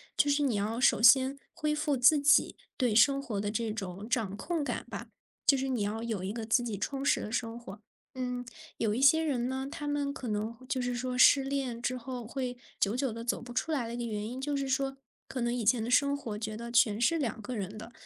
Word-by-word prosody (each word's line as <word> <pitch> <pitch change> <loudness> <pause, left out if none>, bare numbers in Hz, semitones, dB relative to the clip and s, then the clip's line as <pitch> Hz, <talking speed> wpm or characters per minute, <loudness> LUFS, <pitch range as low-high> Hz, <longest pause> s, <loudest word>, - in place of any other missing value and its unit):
就 290 - +3
是 285 +1 +2
你 260 -5 +1
要 215 +4 -1
首 255 -5 +4
先 265 +3 +6
恢 305 -3 -1
复 295 -2 0
自 260 +5 +6
己 285 +1 +4 0.2
对 245 -5 +1
生 275 +5 +5
活 220 -7 -3
的 205 - -2
这 225 +1 -2
种 195 0 -6
掌 215 -5 -1
控 325 - -2
感 - - -3
吧， - - -6 0.4
就 275 - +6
是 270 +1 -2
你 245 -5 -1
要 215 +3 -2
有 215 -5 -3
一 195 - -3
个 225 0 -5
自 225 +3 +3
己 225 -4 -3
充 275 +7 -3
实 - - +3
的 215 - -6
生 235 -1 -3
活。 205 -2 -11 0.3
嗯， 250 -1 -4 0.3
有 215 -2 0
一 245 - -1
些 320 +4 +6
人 255 -5 -1
呢， 265 +1 -3
他 295 0 -6
们 285 -1 -1
可 265 -4 -7
能 215 +2 -2
就 260 - 0
是 245 0 -1
说 250 +1 -3
失 270 +1 +7
恋 270 -4 -3
之 255 +1 -1
后 245 -2 -6
会 250 0 -3 0.2
久 205 +3 +1
久 255 -2 0
地 230 +1 -6
走 235 - -1
不 245 - -9
出 240 +6 -2
来 260 -7 -1
的 235 - -5
一 - - -5
个 240 - -3
原 210 -1 -3
因， 255 - -6
就 285 +2 -2
是 275 -1 -2
说 270 +1 -1 0.3
可 255 - -4
能 240 0 0
以 240 -3 -2
前 230 +1 +3
的 230 - -3
生 280 +3 +3
活 225 -7 -5
觉 215 0 -4
得 235 +1 -7
全 225 -3 +3
是 330 +7 +3
2 230 -6 -2
个 250 +3 -5
人 200 0 -4
的， 225 +2 -9
245 Hz, 270 characters per minute, -30 LUFS, 220-275 Hz, 0.4 s, 失